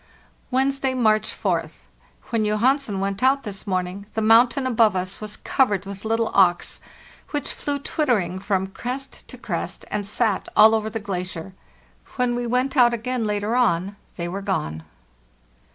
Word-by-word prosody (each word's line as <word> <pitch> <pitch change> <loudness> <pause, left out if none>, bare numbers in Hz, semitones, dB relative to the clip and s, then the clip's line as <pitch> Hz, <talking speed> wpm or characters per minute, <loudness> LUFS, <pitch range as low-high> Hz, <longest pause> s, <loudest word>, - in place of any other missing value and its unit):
"Wednesday, 265 0 +1
March 215 -3 +2
4th. - - -2 0.5
When 230 -2 +1
Johansen 215 +1 +1
went 195 +1 -2
out 270 +2 +3
this 200 -3 -7
morning 185 +1 -2
the 220 - 0
mountain 235 +4 +5
above 225 -5 +3
us 185 +2 -3
was 210 0 -5
covered 205 -8 +1
with 200 +1 -8
little 225 +1 0
auks, 180 -3 +3 0.5
which 290 -1 -3
flew 285 -1 -2
twittering 240 - 0
from 190 -1 0
crest 250 +8 -6
to - - -10
crest, - - -4
and 205 -1 -2
sat 210 -1 0
all 220 +1 +8
over 220 -1 0
the 225 +1 -4
glacier. 185 -3 -5 0.6
When 250 -2 +1
we 240 0 -2
went 255 +4 0
out 240 -3 +5
again 235 0 -2
later 210 +2 -1
on 200 -5 +1 0.2
they 170 -1 -4
were 190 +3 -4
gone. 80 - -2
215 Hz, 155 wpm, -23 LUFS, 195-250 Hz, 0.6 s, all